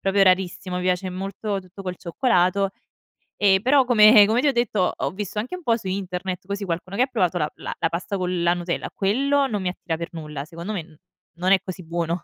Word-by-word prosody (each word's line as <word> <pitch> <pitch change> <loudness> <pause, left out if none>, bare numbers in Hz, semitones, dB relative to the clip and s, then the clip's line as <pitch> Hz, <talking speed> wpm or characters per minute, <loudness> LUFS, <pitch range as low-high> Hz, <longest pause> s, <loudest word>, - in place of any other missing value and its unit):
proprio 195 +1 +2
rarissimo. 185 -1 +1
Mi 180 - -2
piace 185 +1 0
molto 195 +2 -4
tutto 185 +1 -12
col 180 -1 -4
cioccolato. 190 0 +1 0.7
E 195 -2 +5
però 265 +3 +4
come 215 -3 +7
come 225 +4 +2
ti 295 - +2
ho - - +5
detto, 230 -7 +1
ho - - -2
visto 205 +1 -6
anche 250 +11 -4
un 365 - -9
po' 230 -5 +2
su 205 - -8
internet 185 -1 -4
così, 200 0 -3
qualcuno 175 +2 -4
che 245 - +3
ha - - 0
provato 185 -9 0
la 150 -3 +1
la - - -6
la - - 0
pasta 185 +5 -3
con 180 -1 -1
la 170 0 +4
Nutella, 175 0 -3
quello 275 +8 +1
non 210 -5 -2
mi 185 - -2
attira 175 -2 -4
per 170 0 -4
nulla 150 -3 -6
secondo 170 +5 -6
me 195 - -2
no 160 -1 -19 0.4
non 180 +2 +1
è 195 - +6
così 185 -1 -7
buono. 170 +1 -2
190 Hz, 230 wpm, -23 LUFS, 180-210 Hz, 0.7 s, come